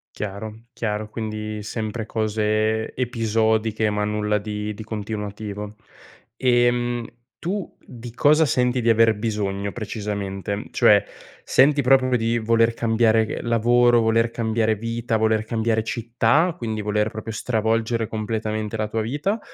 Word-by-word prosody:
Chiaro, 105 +2 -6
chiaro, 105 -2 -3
quindi 110 -1 -5
sempre 110 +1 -4
cose 110 0 0
episodiche, 110 -3 +1
ma 105 0 -1
nulla 105 0 0
di 105 0 -4
di 110 +2 -8
continuativo. 105 -1 -5 0.6
Ehm, 120 -1 +1 0.3
tu 185 +1 -4
di 120 -1 -10
cosa 150 +5 +4
senti 125 -2 +1
di 115 - +1
aver 115 0 +5
bisogno 100 -2 -2
precisamente? 100 -2 -4
Cioè, - - +5 0.4
senti 140 +2 +4
proprio 130 -1 +4
di 115 +1 0
voler 115 +1 +2
cambiare 110 -1 +2
lavoro, 120 +1 +3
voler 115 +1 +2
cambiare 110 -1 0
vita, 115 +1 -2
voler 110 0 +1
cambiare 110 -1 0
città, 120 +9 +1
quindi 110 -6 -3
voler 105 +1 0
proprio 110 +1 -6
stravolgere 115 +1 0
completamente 110 0 -3
la 110 0 -1
tua 110 +1 -1
vita 145 - -1
110 Hz, 125 wpm, -23 LUFS, 105-120 Hz, 0.6 s, aver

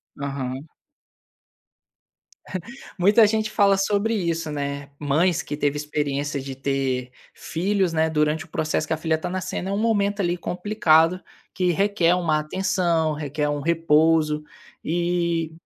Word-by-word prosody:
Aham. 135 0 -5 2.3
Muita 205 +5 +6
gente 215 0 0
fala 200 -2 +4
sobre 205 +3 +1
isso, 165 -6 -1
né, 140 -1 -4
mães 165 +4 +1
que 145 - -5
teve 145 -1 0
experiência 145 -1 -2
de 135 0 -6
ter 135 -2 -2 0.2
filhos, 190 +2 -1
né, 160 0 +2
durante 155 0 0
o - - -20
processo 155 -1 -1
que - - 0
a - - -1
filha 160 0 0
tá 160 - -5
nascendo 185 +1 -3
é - - -2
um 200 - -1
momento 205 -2 +1
ali 175 -1 0
complicado, 180 -2 +2 0.4
que 180 -1 +2
requer 195 -1 +2
uma 160 -4 +1
atenção, 170 -1 0
requer 150 0 -2
um 145 0 -2
repouso, 160 -1 +2 0.4
e 170 -1 0
160 Hz, 140 wpm, -23 LUFS, 150-185 Hz, 2.3 s, Muita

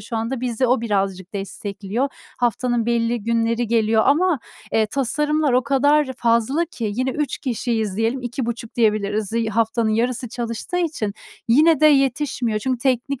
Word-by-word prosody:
şu 225 +3 -5
anda. 230 +3 -2
Bizi 250 0 0
o 250 0 +2
birazcık 195 -3 -2
destekliyor. 200 +4 -3 0.3
Haftanın 240 0 0
belli 235 -1 0
günleri 230 +1 0
geliyor 220 -1 +2
ama, 325 +3 +3 0.3
eee, 220 -1 +3
tasarımlar 295 +4 0
o 250 +1 +3
kadar 285 +4 +3
fazla 235 +7 +2
ki, 230 - -4
yine 255 +3 0
3 295 +2 -2
kişiyiz 225 -5 -2
diyelim 225 +4 0
2,5 240 -1 -4
diyebiliriz. 215 -2 0
Iıı, 230 -1 0
haftanın 225 +1 +1
yarısı 240 +2 0
çalıştığı 235 +6 -4
için 305 - -2 0.3
yine 305 +5 +5
de 310 - +7
yetişmiyor, 270 -5 +2
çünkü 255 +3 -1
teknik 255 +1 0
235 Hz, 150 wpm, -21 LUFS, 220-265 Hz, 0.3 s, de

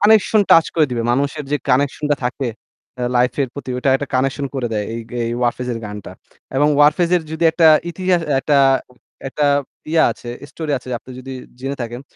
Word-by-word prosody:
Connection 215 0 +5
touch 165 - +7
করে 155 -2 +4
দিবে। 120 -2 -1
মানুষের 140 +3 -1
যে - - +4
কানেকশন 140 +3 +1
টা 145 - +3
থাকে 125 +1 -2 0.5
অ্যা 125 -1 -2
লাইফ 125 0 +3
এর 135 - -2
প্রতি 140 -2 -7
ওইটা 130 +2 +1
একটা 140 0 -6
কানেকশন 135 +2 0
করে 130 -3 -1
দেয় 105 -1 -1
এই 115 - -4
এই 120 -1 -2
Warfaze 125 +1 -1
এর 115 - -4
গানটা। 105 -1 -8 0.4
এবং 145 +2 +4
Warfaze 155 +4 +4
এর 175 - -1
যদি 160 +1 -1
একটা 165 -1 +5 0.2
ইতিহা 185 +1 +1
একটা 140 +1 +3 0.6
একটা 145 +2 -1 0.5
ইয়া 165 - +5
আছে 120 - -9 0.2
স্টোরি 155 0 -4
আছে 130 - -14
আপনি 130 - -16
যদি 135 +1 -8 0.3
জেনে 135 +2 -3
থাকেন। 120 +1 -6
135 Hz, 195 wpm, -19 LUFS, 125-155 Hz, 0.6 s, touch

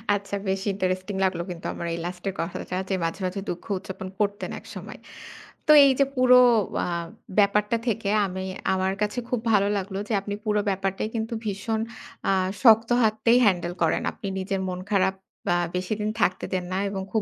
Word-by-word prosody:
আচ্ছা 200 0 -4
বেশ 190 0 0
ইন্টারেস্টিং 185 0 -2
লাগলো 185 -2 0
কিন্তু 170 -2 -7
আমার 170 - -5
এই 170 - -3
লাস্টের 180 +2 -4
কথাটা 170 +2 -4
যে 195 - +1
মাঝে 165 +3 -2
মাঝে 185 +2 -3
দুঃখ 175 - -5
উদযাপন 190 0 -7
করতেন 205 0 -1
একসময়। - - -9 0.7
তো - - +7
এই 275 - +6
যে 275 - +6
পুরো 255 0 +6 0.5
আ - - -3 0.5
ব্যাপারটা 210 +2 +3
থেকে 225 -2 0 0.2
আমি 190 0 -4 0.3
আমার 190 0 0
কাছে 210 +3 0
খুব 250 - 0
ভালো 200 -1 +4
লাগলো 195 0 -4
যে - - 0
আপনি 205 +1 -4
পুরো 210 -1 +2
ব্যাপারটাই 195 +1 -1
কিন্তু 225 +1 -2
ভীষণ 215 +2 -2 0.5
আ - - +4 0.3
শক্ত 225 -1 +7
হাততেই 220 +2 +3
হ্যান্ডেল 175 -3 +1
করেন। 165 - +2
আপনি 200 - -8
নিজের 190 0 -2
মন 180 0 -4
খারাপ 190 -1 +2
আ - - -20
বা 175 - +3 0.2
বেশিদিন 210 +3 -2
থাকতে 185 -2 +1
দেন 185 -1 -1
না - - 0
এবং 195 -1 -4
খুব 220 - +2
195 Hz, 180 wpm, -25 LUFS, 185-210 Hz, 0.7 s, তো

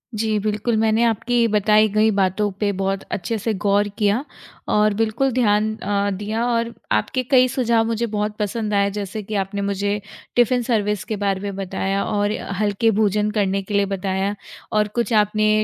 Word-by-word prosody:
जी, 215 0 0
बिल्कुल, 215 +2 -1
मैंने 220 +1 +2
आपकी 235 +1 +2
बताई 215 0 +4
गई 215 +2 +3
बातों 195 +2 +1
पे 205 -1 +1
बहुत 195 0 -1
अच्छे 225 +4 -2
से 220 +2 -1
गौर 205 +1 +3
किया 210 +4 +1 0.5
और 210 0 +3
बिल्कुल 225 +5 0
ध्यान 215 -3 +2
अ, 205 -1 -1
दिया 215 +3 -2
और 235 -1 0 0.2
आपके 180 - 0
कई 255 -1 +6
सुझाव 235 -3 +1
मुझे 230 +1 -1
बहुत 210 -1 -2
पसंद 210 +1 -2
आए, 200 0 +3
जैसे 205 +1 -5
कि 210 +2 -5
आपने 200 +1 -5
मुझे 200 +1 -1 0.4
टिफ़िन 245 +1 +3
सर्विस 210 -4 0
के 220 - -4
बारे 195 -1 +1
में 200 -1 -4
बताया 195 0 -2
और 205 0 0 0.3
हल्के 210 +2 +2
भोजन 210 0 +2
करने 200 -2 0
के 195 +2 -8
लिए 200 0 +3
बताया 195 +1 -2 0.4
और 210 -1 +2
कुछ 235 -2 0
आपने 215 0 +3
210 Hz, 175 wpm, -21 LUFS, 200-225 Hz, 0.5 s, कई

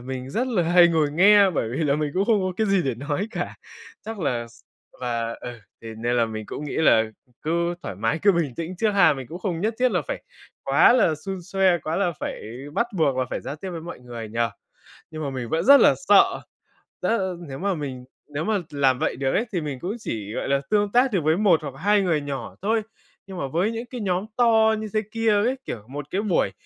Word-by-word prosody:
mình 130 +1 -6
rất 250 - -1
là 220 -8 +1
hay 175 +1 +6
ngồi 160 -3 +1
nghe 200 +4 +6
bởi 145 -9 -1
vì 135 +8 -2
là 140 -2 +2
mình 150 -1 -1
cũng 190 - +2
không 220 -2 +3
có 185 0 -1
cái 220 - +1
gì 195 -3 +2
để 135 -4 -1
nói 145 - -3
cả. - - -4 0.5
Chắc 225 -1 -5
là 120 -7 -1
s - - -19 0.4
và 115 -2 -2
ừ, 125 - -6 0.3
thế 115 -1 -7
nên 120 +2 0
là 115 -1 +3
mình 110 -1 -6
cũng 150 - -6
nghĩ 145 - -5
là 115 -8 +5 0.4
cứ 170 +2 0
thoải - - -5
mái, 115 - -1
cứ 200 - +6
bình 165 -8 -1
tĩnh 170 +5 -5
trước 220 +3 +1
ha. 200 -1 +5
Mình 135 -2 -7
cũng 170 - -7
không 180 -3 -3
nhất 220 +4 0
thiết 255 0 +3
là - - +1
phải - - -4 0.4
quá - - +5
là 215 -10 +3
xun 190 +5 -6
xoe, 190 -1 +2
quá 160 +1 -3
là 190 -3 +1
phải - - -4 0.3
bắt 235 - +1
buộc 145 -6 +2
là 130 - +1
phải - - -3
giao 145 - -6
tiếp 190 +4 -7
với 170 -2 -6
mọi 170 +2 -8
người 120 -3 -8
nhỉ? 115 +2 -4 0.7
Nhưng 155 -1 -6
mà 140 - -2
mình 130 -3 -5
vẫn 165 +5 0
rất 280 +2 +8
là - - +6
sợ, - - +5 0.6
rất, 230 - +1
ơ, 190 -3 -2
nếu 135 - -6
mà 200 +1 0
mình 135 -6 -6 0.3
nếu 145 +2 -2
mà 220 +1 +1
làm 135 -3 +2
vậy - - 0
được 135 +1 -1
ấy 235 - +1
thì 175 - 0
mình 145 -4 -5
cũng 185 - -4
chỉ, 105 - -5
gọi - - -3
là, 140 0 +2
tương 205 -1 +2
tác 250 +3 +4
được 185 - +2
với 155 +2 +2
một 190 -6 +4
hoặc 140 - -5
hai 205 +5 +3
người 170 -6 +1
nhỏ 140 -4 -6
thôi. 220 +3 +1 0.5
Nhưng 190 -1 -8
mà 140 - -2
với 175 +10 0
những 230 +1 -5
cái 245 -1 -7
nhóm 185 -1 -1
to 225 -2 +4
như 215 - -4
thế 215 - +2
kia 225 0 +1
ấy, 210 +5 +2
kiểu, 110 - -6
một 145 +1 -7
cái 195 - 0
buổi 185 - +1
170 Hz, 250 wpm, -24 LUFS, 135-205 Hz, 0.7 s, rất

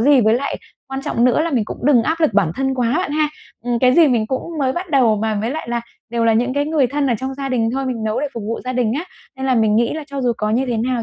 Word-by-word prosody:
gì. 275 +2 +5
Với 220 +1 +3
lại 275 +3 -2 0.3
quan 270 0 -4
trọng 235 - 0
nữa 250 +4 +3
là 335 - 0
mình 245 -7 +1
cũng - - -7
đừng 255 -6 +5
áp 325 +6 -1
lực 300 -10 +2
bản 195 -6 +3
thân 265 0 0
quá 245 -1 0
bạn 360 -5 -1
ha, 305 0 +1 0.4
ừm, 240 -1 0
cái 255 +1 +4
gì 330 -4 +6
mình 230 -4 +1
cũng 260 +3 -2 0.2
mới 265 -2 +1
bắt 350 +1 -5
đầu 245 -6 +4
mà, 220 +1 -1
với 225 - -2
lại 300 -4 -5
là 235 0 -1 0.3
đều 235 -1 0
là 225 - +4
những 245 +4 +1
cái 285 - +1
người 305 -5 +2
thân 280 +2 -1
ở - - +2
trong 265 +1 -4
gia 275 0 -4
đình 230 -3 +1
thôi 270 0 -2
mình 230 -4 -3
nấu 215 +1 -1
để 295 - -1
phục 230 - -5
vụ 230 - -3
gia 255 - -2
đình 240 -3 +1
á, 340 - -4 0.3
nên 265 0 -3
là 260 - +2
mình 220 -2 +3
nghĩ 235 +1 +2
là 310 -2 -5
cho 280 -2 -5
dù 245 -1 +2
có 210 0 -1
như 255 +4 +1
thế 240 - -1
nào 240 +1 -1
255 Hz, 320 wpm, -19 LUFS, 230-275 Hz, 0.4 s, gì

